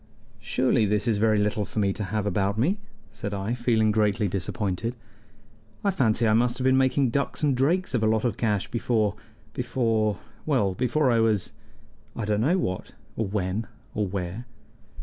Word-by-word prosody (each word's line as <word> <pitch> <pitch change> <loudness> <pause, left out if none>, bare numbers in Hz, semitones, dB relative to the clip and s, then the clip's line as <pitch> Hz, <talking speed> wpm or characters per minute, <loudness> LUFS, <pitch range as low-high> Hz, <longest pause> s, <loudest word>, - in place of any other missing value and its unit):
"Surely 115 +1 +1
this 105 +2 0
is 110 -3 +2
very 110 0 +3
little 105 +1 +1
for 100 - -9
me 100 -2 +2
to 105 - -4
have 105 +2 -2
about 100 +1 0
me!" 175 - +1 0.3
said 100 0 -5
I, 100 +4 -2
feeling 115 -3 +2
greatly 105 0 +2
disappointed. 100 +4 -2 0.9
"I 200 - +3
fancy 115 - +2
I 110 - +4
must 120 +2 +2
have 130 - -3
been 130 0 +5
making 130 -1 +3
ducks 140 +4 -1
and 140 -3 +3
drakes 160 +7 +1
of 120 - +1
a 110 - +3
lot 110 +1 +1
of 115 -4 0
cash 105 -4 0
before 115 -3 +1 0.4
before 110 -5 0 0.3
well, 125 -11 +1
before 130 +6 +1
I 115 - +3
was 110 -4 +1 0.6
I 115 - -3
don't 105 0 +1
know 160 +10 +3
what, 95 - -3 0.2
or 110 - -1
when, 100 +2 -2 0.3
or 105 -1 0
where." 95 +5 -4
110 Hz, 180 wpm, -26 LUFS, 105-125 Hz, 0.9 s, been